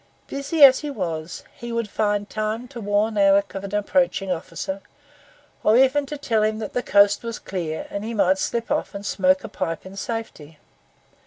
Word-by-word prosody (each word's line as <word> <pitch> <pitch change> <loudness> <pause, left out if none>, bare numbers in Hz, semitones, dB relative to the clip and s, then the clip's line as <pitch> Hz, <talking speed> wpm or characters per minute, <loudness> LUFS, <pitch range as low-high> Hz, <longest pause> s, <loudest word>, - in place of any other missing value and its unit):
Busy 280 +3 0
as 265 -2 +9
he 300 - -5
was, 165 - -4
he 235 0 -7
would 230 -1 -1
find 205 0 -1
time 215 +3 -3
to 245 -4 -8
warn 205 +1 +1
Alick 200 0 +4
of 195 - -5
an 200 +1 -4
approaching 210 -2 +1
officer, 190 +3 -4 0.8
or 215 +2 +5
even 270 +2 +3
to 295 - -5
tell 230 -6 0
him 215 0 +1
that 215 -2 -6
the 245 - 0
coast 205 -3 +4
was 230 -1 -5
clear, 170 -5 -4
and 200 - -4
he 230 +1 -4
might 190 -2 +3
slip 235 +2 -2
off - - -1
and 200 +1 -6
smoke 185 -1 +2
a - - -5
pipe 165 +2 -4
in 190 +1 -10
safety. 195 -9 -6
210 Hz, 190 wpm, -23 LUFS, 195-235 Hz, 0.8 s, as